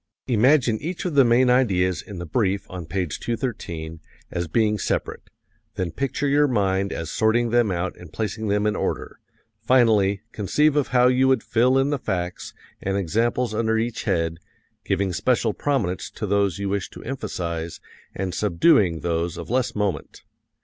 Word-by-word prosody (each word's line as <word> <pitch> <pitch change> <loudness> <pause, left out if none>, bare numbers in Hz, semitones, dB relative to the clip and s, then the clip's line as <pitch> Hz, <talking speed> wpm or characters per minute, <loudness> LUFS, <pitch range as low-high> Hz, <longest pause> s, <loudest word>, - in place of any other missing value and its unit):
Imagine 125 -1 +3
each 170 +5 -5
of 180 - -1
the 140 -1 +6
main 120 +1 +4
ideas 95 -9 +2
in 100 - -10
the 85 - -5
brief 100 +2 0
on 90 -3 -7
page 90 -4 -3
213 85 -10 -4 0.3
as 85 -1 -2
being 105 +4 +1
separate; - - -3 0.5
then 90 -3 -2
picture 140 - -2
your 145 +1 +4
mind 100 -5 0
as 80 -2 -4
sorting 115 +1 +2
them 120 -2 +3
out 90 0 -2
and 90 -3 -12
placing 110 +2 -3
them 105 +1 +1
in 105 0 +1
order; - - -3 0.4
finally, 105 -6 +3
conceive 150 +9 +1
of 145 -3 +2
how 125 0 +4
you 130 +1 +3
would 130 0 +2
fill 125 +3 +3
in 135 +2 +2
the 145 - -1
facts 90 -6 -3 0.3
and 95 0 -1
examples 115 +6 0
under 110 0 +1
each 115 +1 -2
head, 80 -1 0 0.4
giving 95 -2 0
special 115 +2 +1
prominence 110 -11 -1
to - - -5
those 100 -3 +1
you 100 0 -3
wish 100 -1 -2
to - - -11
emphasize 85 -10 -4 0.4
and 95 -2 -3
subduing 95 - +3
those 85 0 -1
of - - -7
less 125 0 0
moment. 105 -3 -3
105 Hz, 170 wpm, -23 LUFS, 90-125 Hz, 0.5 s, the